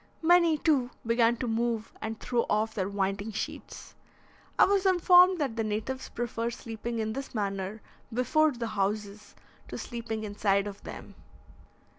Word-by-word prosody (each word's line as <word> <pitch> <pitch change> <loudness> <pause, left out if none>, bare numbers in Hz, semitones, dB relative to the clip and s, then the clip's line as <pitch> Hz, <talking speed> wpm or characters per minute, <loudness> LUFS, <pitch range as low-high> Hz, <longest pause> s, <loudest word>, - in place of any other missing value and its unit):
Many, 340 -1 +5
too, 285 -5 +2 0.2
began 230 0 +3
to 250 - -3
move 230 -1 -1
and 220 0 -4
throw 240 -2 0
off 215 +1 +1
their 195 -3 -2
winding 200 +2 -2
sheets. 215 - -6 0.6
I - - +7
was 395 -1 +2
informed 365 0 +6
that 275 -8 -2
the 225 - -1
natives 220 +5 -3
prefer 235 -1 -3
sleeping 230 0 -5
in 220 -1 -2
this 270 0 -6
manner 200 0 -3 0.3
before 255 +7 +3
the 240 -3 -4
houses 205 0 -3 0.3
to - - -6
sleeping 230 -2 -5
inside 205 -1 +1
of 205 -1 -7
them. - - -9
225 Hz, 150 wpm, -29 LUFS, 210-255 Hz, 0.6 s, I